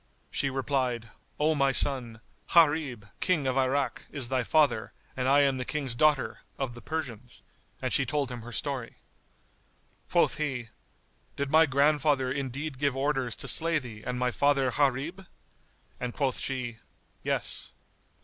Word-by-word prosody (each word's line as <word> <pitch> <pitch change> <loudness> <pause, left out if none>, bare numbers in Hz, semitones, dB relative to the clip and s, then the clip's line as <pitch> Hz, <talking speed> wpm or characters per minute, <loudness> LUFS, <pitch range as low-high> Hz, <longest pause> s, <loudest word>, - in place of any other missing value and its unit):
She 135 - +1
replied, 130 -3 -1 0.3
"O 155 +2 +3
my 140 -2 +3
son, 125 -5 +1 0.3
Gharib, 145 -9 +4
King 165 -6 +1
of 130 -1 +1
Irak, 135 -1 0
is 135 -5 -2
thy 130 -1 +1
father 140 -5 +2 0.2
and 130 -1 -1
I 140 +2 +6
am 135 -2 +2
the - - -1
King's 140 -3 -2
daughter, 150 +2 +2 0.2
of 135 -3 -3
the 120 - -11
Persians," 130 -7 -5 0.4
and - - 0
she - - +4
told 145 -4 -1
him 120 -1 -6
her 120 +2 -9
story. 130 -1 -3 1.1
Quoth - - +3
he, 130 -6 -2 0.7
"Did 140 0 -2
my 160 +1 +6
grandfather 140 -1 +2
indeed 135 +1 -4
give 140 -2 +1
orders 135 -3 0
to - - -6
slay 165 0 +3
thee 120 -7 -7
and 125 0 -3
my 125 0 +1
father 140 -1 +2
Gharib?"; 145 +8 0 0.7
and 125 -1 -4
quoth 135 -3 0
she, 125 -4 -3 0.4
"Yes." - - -1
135 Hz, 150 wpm, -28 LUFS, 125-145 Hz, 1.1 s, I